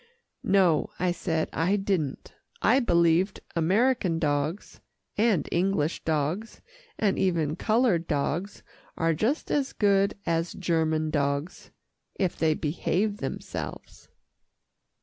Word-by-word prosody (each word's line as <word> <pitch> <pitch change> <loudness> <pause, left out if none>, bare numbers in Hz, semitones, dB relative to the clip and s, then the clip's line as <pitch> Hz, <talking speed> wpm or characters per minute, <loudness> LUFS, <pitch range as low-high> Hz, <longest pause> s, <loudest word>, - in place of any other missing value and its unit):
"No," 185 -6 +3
I 180 0 +1
said, 165 -2 -1
"I 180 +5 +1
didn't. 190 -8 -2 0.3
I 265 - +4
believed 175 -3 +2 0.2
American 185 +1 +2
dogs, 150 +3 -2 0.3
and 215 -4 +2
English 175 -3 0
dogs, 160 +8 -2 0.4
and 205 -3 +1
even 165 -5 +1
coloured 215 -4 +1
dogs, 160 +6 -2 0.3
are 165 0 +2
just 230 - -1
as 275 -2 0
good 200 -1 +2
as 165 0 0
German 160 -3 0
dogs, 140 +3 -2 0.5
if 185 -3 -1
they 160 -1 +1
behave 185 +7 -1
themselves." - - -7
175 Hz, 110 wpm, -27 LUFS, 160-200 Hz, 0.5 s, I